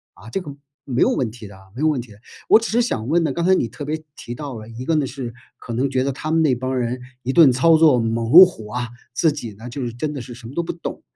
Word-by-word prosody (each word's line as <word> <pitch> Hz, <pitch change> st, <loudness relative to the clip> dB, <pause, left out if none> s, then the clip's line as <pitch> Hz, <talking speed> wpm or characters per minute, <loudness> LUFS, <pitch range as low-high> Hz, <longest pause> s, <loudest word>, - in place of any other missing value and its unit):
啊， 105 Hz, +6 st, -13 dB
这 195 Hz, -, -2 dB
个 145 Hz, -5 st, -9 dB, 0.3 s
没 125 Hz, -1 st, -1 dB
有 -, -, +5 dB
问 120 Hz, -5 st, -1 dB
题 115 Hz, -3 st, -11 dB
的 100 Hz, -, -13 dB, 0.2 s
没 135 Hz, -, -5 dB
有 155 Hz, -, +3 dB
问 150 Hz, -5 st, +1 dB
题 115 Hz, -, -14 dB
的。 100 Hz, -, -15 dB, 0.3 s
我 220 Hz, -, +8 dB
只 230 Hz, -, -4 dB
是 240 Hz, +2 st, +3 dB
想 115 Hz, -, -2 dB
问 165 Hz, +3 st, +2 dB
呢， -, -, 0 dB
刚 170 Hz, -, -2 dB
才 190 Hz, -, +5 dB
你 120 Hz, -, 0 dB
特 125 Hz, +5 st, -8 dB
别 155 Hz, +1 st, -3 dB
提 120 Hz, -, -7 dB
到 140 Hz, -3 st, -6 dB
了， 110 Hz, 0 st, -9 dB
一 115 Hz, +2 st, -8 dB
个 165 Hz, -, +1 dB
呢 150 Hz, -3 st, +1 dB
是 125 Hz, -4 st, -6 dB, 0.2 s
可 120 Hz, -, -8 dB
能 130 Hz, +4 st, 0 dB
觉 130 Hz, -1 st, 0 dB
得 140 Hz, -, 0 dB
他 155 Hz, +4 st, -6 dB
们 165 Hz, 0 st, +3 dB
那 140 Hz, -4 st, +3 dB
帮 130 Hz, +1 st, -3 dB
人 125 Hz, +1 st, -2 dB, 0.2 s
一 130 Hz, +2 st, -2 dB
顿 155 Hz, -6 st, +7 dB
操 160 Hz, +7 st, +4 dB
作 155 Hz, -6 st, +5 dB
猛 115 Hz, +1 st, -1 dB
如 185 Hz, +3 st, +11 dB
虎 110 Hz, -12 st, -8 dB
啊， 120 Hz, +1 st, -3 dB, 0.2 s
自 160 Hz, +4 st, +2 dB
己 120 Hz, -8 st, -6 dB
呢， 110 Hz, +4 st, -11 dB
就 135 Hz, +3 st, -6 dB
是 120 Hz, -, -3 dB
真 150 Hz, +5 st, -3 dB
的 135 Hz, -, -5 dB
是 120 Hz, 0 st, -9 dB
什 120 Hz, -2 st, -11 dB
么 130 Hz, -, -10 dB
都 170 Hz, -, +1 dB
不 -, -, -3 dB
懂。 170 Hz, -, -7 dB
130 Hz, 330 characters per minute, -21 LUFS, 120-155 Hz, 0.3 s, 如